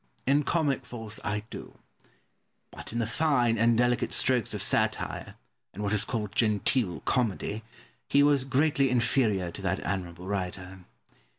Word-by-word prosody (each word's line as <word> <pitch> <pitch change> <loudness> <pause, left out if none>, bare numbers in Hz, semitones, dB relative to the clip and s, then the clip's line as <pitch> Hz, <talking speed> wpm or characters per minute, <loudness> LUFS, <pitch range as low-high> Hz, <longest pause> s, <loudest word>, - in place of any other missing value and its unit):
Pope. - - -40 0.2
In 140 +2 +3
comic 150 -3 0
force 110 -3 -6
I 105 0 -2
do; - - -9 0.9
but - - -9
in 115 - -4
the 115 - 0
fine 120 -3 +1
and 115 0 +4
delicate 120 0 +1
strokes 125 -4 +2
of - - 0
satire, - - 0 0.4
and 105 - -5
what 100 +1 -1
is 105 - +4
called 105 -4 -3
genteel 110 -2 +1
comedy, 110 -2 -1 0.5
he 140 - +5
was 145 -2 +3
greatly 140 0 +2
inferior 115 -7 +1
to 100 - -9
that 95 0 -1
admirable 90 -2 -4
writer. 95 -1 -4
115 Hz, 155 wpm, -28 LUFS, 100-130 Hz, 0.9 s, he